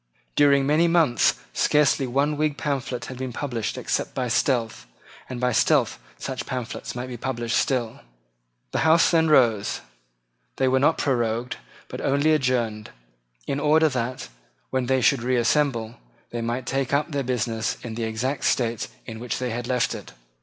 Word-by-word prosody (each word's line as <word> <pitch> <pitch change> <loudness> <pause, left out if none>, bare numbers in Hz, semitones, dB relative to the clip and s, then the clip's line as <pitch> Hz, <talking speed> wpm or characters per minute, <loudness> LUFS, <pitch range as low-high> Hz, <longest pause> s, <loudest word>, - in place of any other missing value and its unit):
During 140 -1 +5
many 155 +4 +3
months 165 -8 +3 0.2
scarcely 145 -2 +3
one 140 +4 +1
Whig 150 -1 0
pamphlet 130 -4 -3
had 130 0 -8
been 130 -1 -3
published 120 -4 -3
except - - -2
by 125 -2 -1
stealth; 115 -1 0 0.4
and 125 -1 -5
by 125 0 +1
stealth 105 - +2 0.2
such 130 - -5
pamphlets 125 -3 -5
might 125 0 -4
be 125 -1 -7
published 120 -2 -2
still. 120 -4 0 0.7
The - - -1
Houses 160 +1 +5
then 160 -2 +3
rose. 115 -8 +3 0.7
They 130 - +1
were 130 +1 +3
not 150 +4 +3
prorogued, 120 -2 -1 0.3
but - - -7
only 140 +3 +2
adjourned, 120 -7 0 0.6
in 140 - -2
order 155 +2 +4
that, 125 -1 -3 0.4
when 130 -2 0
they 130 0 +2
should 130 +1 +3
reassemble, 120 -1 +1 0.3
they 120 - -3
might 120 +2 -2
take 135 0 -1
up 150 +3 0
their 140 -1 -1
business 120 -3 -1
in 120 -2 -5
the 115 0 -3
exact 120 +6 -2
state 115 -3 0 0.2
in 110 -1 -7
which 120 -1 -3
they 125 -1 -2
had 120 +1 -4
left 125 -2 +1
it. - - -9
130 Hz, 165 wpm, -24 LUFS, 120-140 Hz, 0.7 s, During